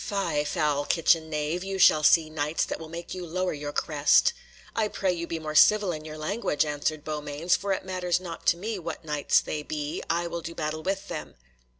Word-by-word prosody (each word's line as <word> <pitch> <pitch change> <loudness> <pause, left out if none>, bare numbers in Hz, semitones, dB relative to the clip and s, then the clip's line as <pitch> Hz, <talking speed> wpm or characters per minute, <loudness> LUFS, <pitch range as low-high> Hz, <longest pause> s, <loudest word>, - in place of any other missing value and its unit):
"Fie, 170 -7 -1
foul 150 -2 0
kitchen 165 -1 +2
knave, 155 +3 -2
you 195 0 -3
shall 155 -4 +6
see 155 +1 +5
Knights 155 0 -1
that - - -5
will 160 -1 -9
make 170 +1 -7
you 185 -1 -5
lower 180 +2 -2
your 145 -1 -5
crest." - - +3 0.4
"I 220 -2 +2
pray 190 -3 0
you 170 -1 -4
be 165 - -3
more 155 -1 -5
civil 205 +4 +5
in 155 -2 -6
your 155 0 -7
language," 155 -1 0
answered 150 +1 -2
Beaumains, 150 +2 -1
"for 200 0 -2
it 190 - -1
matters 180 -2 0
not 175 -3 -8
to 170 - +5
me 210 +2 -4
what 165 -1 -6
Knights 150 -2 +2
they 150 - -4
be, 150 0 -4
I 170 +1 +1
will 170 0 -4
do 170 +1 -7
battle 155 0 -3
with 195 +3 -2
them." 160 -3 -6
165 Hz, 215 wpm, -27 LUFS, 155-180 Hz, 0.4 s, shall